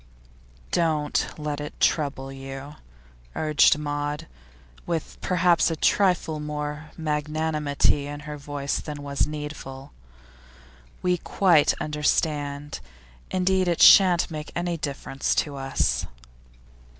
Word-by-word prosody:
'Don't 155 Hz, -3 st, +1 dB
let 150 Hz, -1 st, -3 dB
it 150 Hz, -, -8 dB
trouble 140 Hz, -3 st, 0 dB
you,' 135 Hz, +1 st, -8 dB, 0.6 s
urged 155 Hz, -1 st, +4 dB
Maud, 145 Hz, +1 st, -3 dB, 0.6 s
with 165 Hz, -2 st, -3 dB
perhaps 180 Hz, -1 st, +3 dB
a 165 Hz, -, -1 dB
trifle 175 Hz, -2 st, +2 dB
more 150 Hz, 0 st, -5 dB
of -, -, -23 dB
magnanimity 150 Hz, -2 st, 0 dB
in 145 Hz, 0 st, -6 dB
her 150 Hz, 0 st, -7 dB
voice 140 Hz, -1 st, -3 dB
than 150 Hz, -2 st, -7 dB
was 140 Hz, 0 st, 0 dB
needful. 150 Hz, -2 st, -7 dB, 1.1 s
We 180 Hz, -1 st, +2 dB
quite 170 Hz, -6 st, +3 dB
understand. 145 Hz, -1 st, -1 dB, 0.5 s
Indeed, 185 Hz, 0 st, +1 dB
it 170 Hz, -2 st, 0 dB
shan't 180 Hz, -4 st, +7 dB
make 150 Hz, -1 st, -6 dB
any 175 Hz, 0 st, -1 dB
difference 140 Hz, -3 st, -2 dB
to 145 Hz, -2 st, 0 dB
us. 135 Hz, -1 st, -1 dB
150 Hz, 110 wpm, -25 LUFS, 145-160 Hz, 1.1 s, shan't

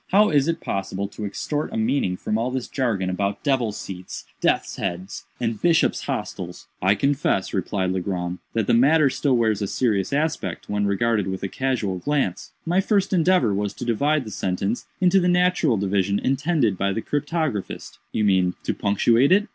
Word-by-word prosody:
How 210 Hz, +3 st, +4 dB
is 145 Hz, -1 st, +3 dB
it 165 Hz, -, -1 dB
possible 95 Hz, 0 st, -3 dB
to 105 Hz, -, -6 dB
extort 150 Hz, +9 st, -3 dB
a -, -, -3 dB
meaning 110 Hz, -5 st, 0 dB
from 105 Hz, -, -2 dB
all 115 Hz, +3 st, 0 dB
this 130 Hz, -1 st, -3 dB
jargon 115 Hz, -9 st, -1 dB
about 100 Hz, +2 st, -2 dB
'devil's 125 Hz, -7 st, 0 dB
seats,' 90 Hz, -1 st, -7 dB
'death's -, -, 0 dB
heads,' 95 Hz, +1 st, -4 dB
and 115 Hz, -3 st, -2 dB
'bishop's 170 Hz, -2 st, +2 dB
hotels?'" -, -, -5 dB, 0.2 s
"I 95 Hz, +3 st, +4 dB
confess," 135 Hz, -4 st, 0 dB
replied 95 Hz, 0 st, -1 dB
Legrand, 90 Hz, -1 st, -3 dB
"that 115 Hz, -2 st, 0 dB
the -, -, +2 dB
matter 140 Hz, +4 st, +5 dB
still 135 Hz, -2 st, +1 dB
wears 110 Hz, -3 st, +1 dB
a 100 Hz, -, 0 dB
serious 105 Hz, -2 st, 0 dB
aspect, 150 Hz, +3 st, -2 dB
when 105 Hz, 0 st, 0 dB
regarded 105 Hz, 0 st, +1 dB
with 95 Hz, 0 st, -4 dB
a -, -, 0 dB
casual 115 Hz, -6 st, -1 dB
glance. 140 Hz, -8 st, -1 dB
My 175 Hz, +3 st, +2 dB
first 200 Hz, -1 st, +1 dB
endeavor 170 Hz, -, +3 dB
was 100 Hz, 0 st, -2 dB
to -, -, -6 dB
divide 140 Hz, +5 st, +1 dB
the 110 Hz, -, -7 dB
sentence 95 Hz, +4 st, -2 dB
into 185 Hz, +1 st, +4 dB
the 180 Hz, -, +1 dB
natural 180 Hz, -9 st, +3 dB
division 100 Hz, 0 st, +1 dB
intended 135 Hz, -, +1 dB
by 100 Hz, 0 st, +1 dB
the 110 Hz, -, -3 dB
cryptographist." 145 Hz, -, -3 dB
"You 110 Hz, -, 0 dB
mean, 95 Hz, -3 st, +2 dB
to -, -, -1 dB
punctuate 115 Hz, -, +3 dB
it?" 205 Hz, +3 st, +4 dB
115 Hz, 180 wpm, -23 LUFS, 100-145 Hz, 0.2 s, matter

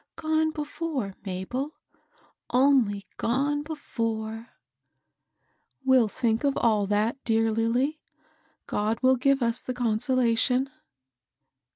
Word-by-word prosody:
— -, -, -64 dB
gone 315 Hz, 0 st, +2 dB
before, 300 Hz, -, -4 dB
Mabel; 245 Hz, +11 st, -4 dB, 0.7 s
only 250 Hz, -7 st, +3 dB
gone 285 Hz, +5 st, 0 dB
before! 230 Hz, -7 st, -4 dB, 0.5 s
'* -, -, -55 dB
" 265 Hz, -, -41 dB
We'll 260 Hz, -4 st, +5 dB
thmk 225 Hz, +2 st, 0 dB
of 280 Hz, -1 st, +1 dB
all 215 Hz, -4 st, +2 dB
that, 215 Hz, +6 st, 0 dB
dear 225 Hz, -1 st, +2 dB
Lilly. 240 Hz, +7 st, 0 dB, 0.7 s
God 215 Hz, +2 st, -1 dB
will 260 Hz, 0 st, +6 dB
give 275 Hz, +1 st, +2 dB
us 230 Hz, +1 st, +1 dB
the 255 Hz, -, -5 dB
consolation." 250 Hz, +2 st, +1 dB
245 Hz, 110 wpm, -27 LUFS, 225-275 Hz, 0.7 s, will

